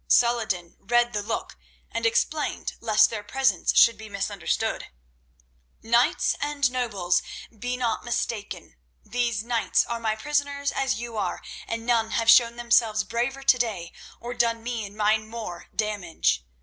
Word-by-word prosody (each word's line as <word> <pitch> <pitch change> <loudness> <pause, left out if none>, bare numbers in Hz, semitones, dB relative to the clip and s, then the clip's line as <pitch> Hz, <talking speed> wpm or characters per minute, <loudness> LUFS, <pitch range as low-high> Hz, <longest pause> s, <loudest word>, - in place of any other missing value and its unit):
Saladin 220 -8 +2
read 240 +3 +2
the 210 - -1
look, 205 - -5 0.3
and - - 0
explained 465 +1 -1
lest 215 -1 +4
their 220 -2 -4
presence 265 +5 +1
should 230 -2 +6
be 220 -1 -9
misunderstood: 200 -2 -2 1.0
"King 235 +2 +3 0.3
and 285 -3 +1
nobles, 205 -8 0 0.4
be 245 +3 -2
not 235 -3 -1
mistaken. 220 - -4 0.3
These 235 -2 -1
knights 235 -1 +1
are 235 0 -3
my 220 -1 0
prisoners, 285 +2 -1
as 265 -5 -1
you 235 -2 -6
are, 205 - -2 0.3
and 230 0 -4
none 230 -2 +2
have 230 -1 +4
shown 235 -1 +6
themselves 235 -3 +2
braver 245 +5 -2
to 260 - +5
day, 200 -8 -2 0.3
or 240 +1 -6
done 230 -1 0
me 230 -3 -3
and 200 +2 -15
mine 215 +1 +2
more 220 -7 -7
damage. 200 - 0
230 Hz, 150 wpm, -25 LUFS, 210-245 Hz, 1.0 s, should